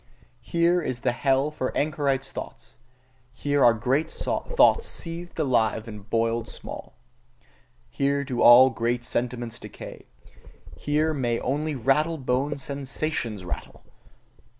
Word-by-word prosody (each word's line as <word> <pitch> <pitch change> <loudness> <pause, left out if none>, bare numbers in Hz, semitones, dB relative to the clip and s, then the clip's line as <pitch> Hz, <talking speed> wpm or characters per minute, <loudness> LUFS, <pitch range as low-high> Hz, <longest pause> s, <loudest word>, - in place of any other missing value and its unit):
Here 170 +7 +2
is 130 -6 -4
the 125 - +2
hell 135 +3 +1
for 130 -4 -3
anchorites' 140 -3 0
thoughts: - - -9 0.6
here 145 +1 +1
are 120 -1 +6
great 135 +8 0
thoughts 480 - +2
seethed 170 +1 -6
alive 115 -7 +1
and 105 -1 -10
boiled 115 0 0
small. - - -9 0.9
Here 140 +4 0
do 130 -3 -3
all 130 +2 +9
great 120 +2 -1
sentiments 120 -1 -3
decay: - - -10 0.7
here 155 +2 0
may 120 -5 0
only 150 +3 -1
rattle 150 +6 +1
boned 135 +2 -1
sensations 135 - -3
rattle! 90 - -7
135 Hz, 120 wpm, -25 LUFS, 120-150 Hz, 0.9 s, all